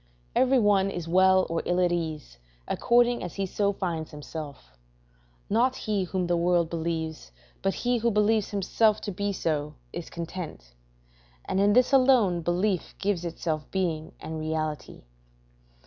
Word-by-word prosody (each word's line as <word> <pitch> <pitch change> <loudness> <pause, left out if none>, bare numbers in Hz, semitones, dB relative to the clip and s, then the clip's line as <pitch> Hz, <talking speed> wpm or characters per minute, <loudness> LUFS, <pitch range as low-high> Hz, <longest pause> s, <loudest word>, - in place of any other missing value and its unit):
Every 260 +1 +4
one 205 -4 +3
is 175 -4 -5
well 185 +2 +5
or 165 0 -1
ill 175 +1 0
at 180 -1 +3
ease, 155 - -4 0.3
according 240 0 +3
as - - -6
he 195 - -1
so 200 +2 0
finds 170 -5 -3
himself; 150 - -8 0.8
not 250 +4 +2
he 205 -3 -1
whom 180 0 -2
the 175 0 +1
world 170 -1 +2
believes, 160 - -3 0.3
but 195 - 0
he 245 0 0
who 235 +1 +1
believes 210 0 +2
himself 210 +2 +2
to 205 - -4
be 200 +2 -2
so, 150 -5 -2 0.2
is 170 -1 -6
content; 165 - -7 0.7
and 190 - -1
in 205 +1 +4
this 250 +3 +4
alone 250 -10 +4
belief 180 +2 -1
gives 195 -3 -1
itself 160 -2 -3
being 170 -5 -2
and 160 0 -6
reality. 155 -1 -4
180 Hz, 150 wpm, -27 LUFS, 160-205 Hz, 0.8 s, well